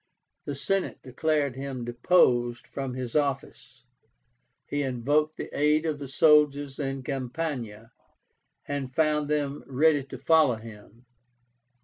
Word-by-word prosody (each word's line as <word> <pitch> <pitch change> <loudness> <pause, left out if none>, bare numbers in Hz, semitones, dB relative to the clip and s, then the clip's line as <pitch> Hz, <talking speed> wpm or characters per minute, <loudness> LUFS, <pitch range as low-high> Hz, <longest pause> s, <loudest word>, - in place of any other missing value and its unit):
The 145 - -4
Senate 195 +7 -1
declared 140 +1 0
him 135 -2 -5
deposed 120 -2 +2
from 135 -2 -5
his 125 -2 -5
office. 135 -3 -2 0.8
He 145 - -2
invoked 145 +4 0
the - - -7
aid 150 +2 +2
of 155 -2 -2
the 140 - -6
soldiers 145 -1 +3
in 135 -2 -3
Campania, 125 -5 -4 0.8
and 140 -3 -3
found 150 -2 +1
them 145 -1 -1
ready 145 +2 +3
to 130 - -9
follow 150 -1 +4
him. 110 +1 -13
140 Hz, 120 wpm, -27 LUFS, 125-150 Hz, 0.8 s, follow